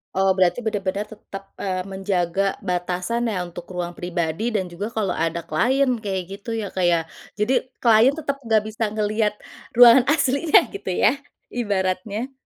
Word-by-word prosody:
Oh 190 0 +3
berarti 185 +5 +3
bener 210 -3 -1
bener 200 +2 -2
tetap, 200 -2 -10
eee, 185 -2 -3
menjaga 190 0 -1
batasan 180 +6 -1
ya, 180 -3 -3
untuk 175 0 -9
ruang 175 -1 -4
pribadi 175 +5 -2
dan 190 -4 -1
juga 200 +6 -6
kalau 205 -6 -1
ada 165 +1 -1
client 245 - +1
kayak 190 -2 -2
gitu 205 +3 -10
ya, 220 -3 -2
Kak, 185 - 0
ya. 170 -1 +4 0.4
Jadi 215 +5 +2 0.3
client 235 +4 +5
tetap 280 -2 -2
nggak 220 -2 +3
bisa 220 +1 -4
ngelihat 215 0 0 0.4
ruangan 240 +1 +8
aslinya 300 +1 +3
gitu 400 - -4
ya, 215 +8 +3 0.3
ibaratnya. 205 +2 -2
200 Hz, 160 wpm, -22 LUFS, 180-230 Hz, 0.4 s, ruangan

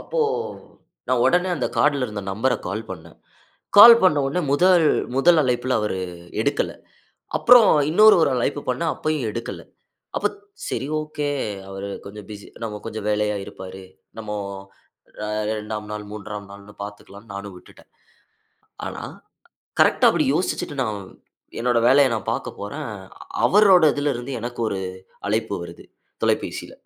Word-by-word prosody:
அப்போ - - -3 0.9
நான் 125 -2 +2
உடனே 180 +1 +3
அந்த 130 - -1
கார்ட்ல 145 -3 +2
இருந்த 105 -1 -6
நம்பர்ர 120 +5 0
கால் 110 +3 -5
பண்ணேன். 85 -3 -9 0.6
கால் 230 +3 +11
பண்ண 155 -6 +5
உடனே 180 +6 -1
முதல் 175 +3 +4 0.3
முதல் 165 +5 +5
அழைப்புல 125 0 0
அவரு 105 -3 -2 0.4
எடுக்கல. - - 0 0.7
அப்புறம் 240 -3 +7 0.2
இன்னொரு 215 +6 +7
ஒரு - - +3
அழைப்பு 125 +4 -1
பண்ணேன். 155 +6 0
அப்பயும் 155 -6 -2
எடுக்கல. 115 +2 -6 0.6
அப்போ - - +1 0.4
சரி 135 - -3
ஓகே, 150 -1 -4 0.4
அவரு 95 +1 -6 0.2
கொஞ்சம் 100 0 -10
பிசி 100 -1 -9 0.4
கொஞ்சம் 110 -2 -5
வேலையா 105 0 0
இருப்பாரு. 95 0 -10 0.4
நம்ம 110 -1 -7 1.3
2வது 105 0 -6
நாள், 105 0 -5
3ம் 105 -1 -7
நாள் 100 0 -14
பாத்துக்கலாம் 100 +1 -11
நானும் 100 -1 -7
விட்டுட்டேன். - - -18 1.0
ஆனா, - - -6 0.8
கரெக்ட்டா - - +5
அப்படி - - +1
யோசிச்சுட்டு 160 -3 -2
நான் 105 -4 -3 0.6
என்னோட 120 0 +2
வேலையை 135 +1 +6
நான் 110 - -3
பாக்க - - -3
போறேன். 140 +6 -5 0.5
அவரோட 195 -4 +6
இதுல 145 0 0
இருந்து 120 +3 -6
எனக்கு 120 +1 -6
ஒரு 95 - -3 0.5
அழைப்பு 110 0 -1
வருது, 85 0 -10 0.4
தொலைபேசில. - - -1
120 Hz, 130 wpm, -22 LUFS, 105-150 Hz, 1.3 s, கால்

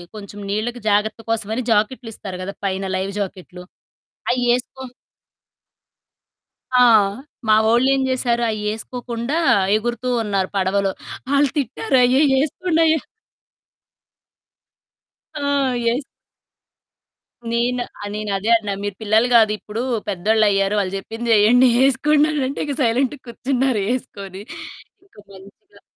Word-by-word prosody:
కొంచెం 205 0 -9
నీళ్ళకి 235 +4 -2
జాగ్రత్త 210 +2 +1
కోసమని 225 +2 -1
జాకెట్లిస్తారు 215 -3 -2
కదా! 195 +2 -5
పైన 190 0 -1
లైవ్ 190 +1 -2
జాకెట్లు. 185 -2 -6 0.7
అయ్యేసుకో 245 +1 0 2.0
ఆ! - - +6 0.7
మా 215 - +6
వోళ్ళేం 260 +4 +3
చేశారు, 240 -2 0
అయ్యేసుకోకుండా 230 +4 -4 0.4
ఎగురుతూ 240 +3 -2 0.2
ఉన్నారు 195 -3 -1
పడవలో. 195 +1 +1 0.4
ఆళ్ళు 280 0 +3
తిట్టారు. 265 0 0
"అయ్యయ్య 265 +2 +4
ఏసుకుండయ్య!" 320 +1 +1 2.4
ఆ! 295 - -5 0.4
యెస్ 240 +5 0 1.5
నేను 245 +1 0 0.2
ఆ! - - -6
నేనదే 210 0 -2
అన్నా. 210 -3 -4
మీరు 205 -1 -3
పిల్లలు 220 +2 +3
కాదు 220 -2 +6
ఇప్పుడు. 215 +2 -5 0.3
పెద్దోళ్ళయ్యారు. 205 +1 +2
వాళ్ళు 190 -1 -2
చెప్పింది 225 +4 -4
చేయండి 230 +5 +5 0.2
ఏసుకోండనంటే, 290 0 +1
ఇక 285 -2 -3
సైలెంట్‌గా 255 +4 0
కూర్చున్నారు 255 -1 -1
ఏసుకొని. 200 -7 -7 0.6
ఇంక 385 - -30 0.2
మంచిగా 200 - -17
230 Hz, 100 wpm, -20 LUFS, 205-255 Hz, 2.4 s, ఆ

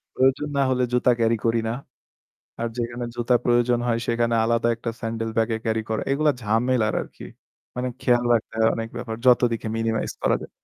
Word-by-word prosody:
প্রয়োজন 135 +3 +2
না - - +3
হলে 125 -1 +1
জুতা 125 0 +4
ক্যারি 115 0 +2
করি 115 0 +2
না। 115 - -1 0.9
আর 115 - 0
যেখানে 120 +1 -3
জুতা 120 +1 +1
প্রয়োজন 120 0 +3
হয়, 115 -1 +1
সেখানে 115 0 +1
আলাদা 115 +1 +1
একটা 115 0 -4
স্যান্ডেল 115 -1 -3
ব্যাগে 115 0 +1
ক্যারি 110 0 0
করা, 110 - -1
এগুলো 150 +2 +3
ঝামেলার 110 +1 +1
আরকি। - - -11 0.5
মানে 125 +1 -1
খেয়াল 120 -1 +2
রাখতে 110 - -2
হয়, 110 0 +4
অনেক 115 0 -4
ব্যাপার। 120 -2 -4
যত 125 -1 +7
দিকে 115 - -4
মিনিমাইজ 115 -1 -1
করা - - +3
যায়। - - -9
115 Hz, 185 wpm, -24 LUFS, 115-125 Hz, 0.9 s, যত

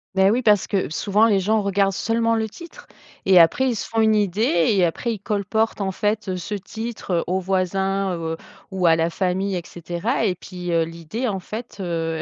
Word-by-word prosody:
Beh, 190 0 +5
oui, 235 +5 +2
parce 210 -4 +4
que 195 -2 -1
souvent 205 +7 +2
les 205 -4 +3
gens 215 +3 +2
regardent 200 0 +1
seulement 230 +3 0
le 220 0 0
titre 340 +10 -13 0.4
et 190 -1 +6
après, 175 +11 +5
ils 240 - -1
se - - -4
font 225 - -2
une 220 -1 +4
idée 200 -4 +2
et 185 -3 +4
après, 230 +8 -2
ils 215 - -7
colportent, 210 +2 -1
en 190 -1 -1
fait, 210 +1 -1
heu, 185 - -2
ce 190 +4 -5
titre, 220 +1 -6
heu, 170 - +1
aux 185 +2 0
voisins, 190 +1 0
heu, 165 -1 -4 0.3
ou 185 -2 -1
à 165 - +6
la 165 +1 +1
famille 190 +2 -1
et 175 - -3
cetera 175 - -3
et 185 -4 +1
puis, 180 0 -7
heu, 165 -1 +3
l'idée, 170 +9 -5
en 195 -4 -2
fait, 220 +3 -8
heu, 165 -2 -2
195 Hz, 215 wpm, -22 LUFS, 180-220 Hz, 0.4 s, et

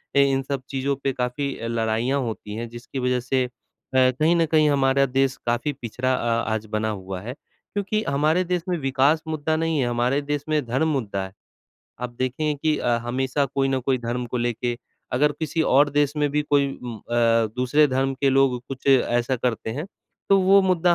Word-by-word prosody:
अ, 140 - +5
इन 135 -1 +3
सब 135 -1 -3
चीज़ों 135 +1 -1
पे 135 - 0
काफ़ी 130 +3 -2
लड़ाइयाँ 115 +4 0
होती 110 -3 -5
हैं, 115 0 -5
जिसकी 120 +3 -7
वजह 125 0 +1
से 130 +1 0
अ, - - -8 0.5
कहीं 130 +6 +4
न 165 -1 +3
कहीं 155 -1 +3
हमारा 135 -1 +3
देश 135 0 +1
काफ़ी 120 +5 0
पिछड़ा 125 +3 -1
अ, 115 -1 0
आज 110 0 -3
बना 110 0 -1
हुआ 95 -3 -5
है 120 +4 -6 0.4
क्योंकि 205 +1 -1
हमारे 155 +6 +2
देश 180 -1 -1
में 175 - 0
विकास 140 +3 +2
मुद्दा 155 0 -1
नहीं 160 -1 0
है, 125 - +1
हमारे 120 +4 +1
देश 145 0 -3
में 150 -1 +1
धर्म 130 +7 0
मुद्दा 110 -10 -1
है 95 - -10 0.7
आप 125 0 -3
देखेंगे 140 +4 -1
कि 155 -1 +2
अ, - - -1
हमेशा 130 +3 0
कोई 135 0 0
ना 135 - +1
कोई 130 0 0
धर्म 120 +1 -3
को 125 - -4
लेके 120 0 -1 0.4
अगर 145 +4 +3
किसी 160 +1 0
और 145 +1 +4
देश 145 0 +2
में 150 -1 +2
भी 150 +1 +1
कोई 145 -1 +2 0.2
म 120 -2 -6
अ, 115 0 +2
दूसरे 145 +4 +3
धर्म 135 +1 0
के 135 +1 +1
लोग 135 -2 +3
कुछ 135 0 -8
ऐसा 125 -1 +3
करते 115 -2 -2
हैं, 150 +9 -4 0.4
तो 195 - +6
वो 195 +1 +6
मुद्दा 180 -2 +3
135 Hz, 200 wpm, -23 LUFS, 120-145 Hz, 0.7 s, तो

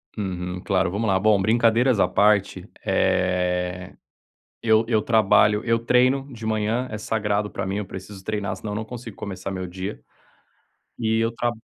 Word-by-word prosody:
Uhum. 90 -3 -4
Claro, 95 -2 +1
vamos 105 +3 -1
lá. 95 -1 +2
Bom, 105 -1 +3
brincadeiras 115 +2 +3
à - - +4
parte, 100 -1 +2 0.2
eh, 90 0 0 0.7
eu 110 0 +3
eu 110 -3 +2
trabalho, 105 -2 +4
eu 115 -1 +2
treino 130 +3 +2
de 115 -2 -8
manhã. 110 +3 0
É 105 - -4
sagrado 105 -1 -1
para 100 - -4
mim, 95 +1 -2
eu 105 - -3
preciso 95 +1 -9
treinar, 100 -3 -3
senão 105 +2 -6
não 110 +1 -3
consigo 115 -3 -9
começar 95 -1 -6
meu 95 -1 -4
dia. 95 +3 -6 1.0
E 110 -1 0
eu 115 +1 +1
tra 120 +1 -1
105 Hz, 165 wpm, -23 LUFS, 95-115 Hz, 1.0 s, à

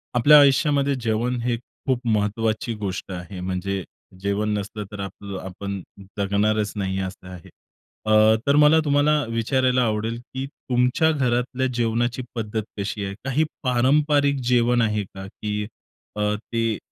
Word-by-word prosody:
आपल्या 145 +5 +8
आयुष्यामध्ये 140 0 +4
जेवण 115 +2 0
हे 120 0 0 0.3
खूप 130 -3 +1
महत्त्वाची 110 +2 0
गोष्ट 100 -2 -5
आहे. 90 +1 -7
म्हणजे 95 +1 -2 0.4
जेवण 100 +2 0
नसलं 105 +1 -5
तर 105 - -8
आपलं 100 0 -6
आपण 100 +1 -5 0.4
जगणारच 105 +1 +1
नाही 95 -2 -2
असं 95 0 -6
आहे. 90 -3 -11 0.6
अ, 110 0 +5
तर 140 - +4
मला 150 +2 +6
तुम्हाला 145 +1 +3
विचारायला 125 +2 +1
आवडेल, 110 +1 -1
की 130 +2 -6
तुमच्या 125 +3 +1
घरातल्या 130 -2 0
जेवणाची 120 +1 0
पद्धत 110 -1 -2
कशी 100 0 -3
आहे? 100 - -4
काही 135 +3 +2 0.2
पारंपरिक 140 +3 +3
जेवण 120 -1 +3
आहे 105 -2 +1
का? 95 0 -10
की 105 +1 -4 0.5
अ, 105 - -3
ते 115 0 -2
115 Hz, 140 wpm, -23 LUFS, 100-130 Hz, 0.6 s, आपल्या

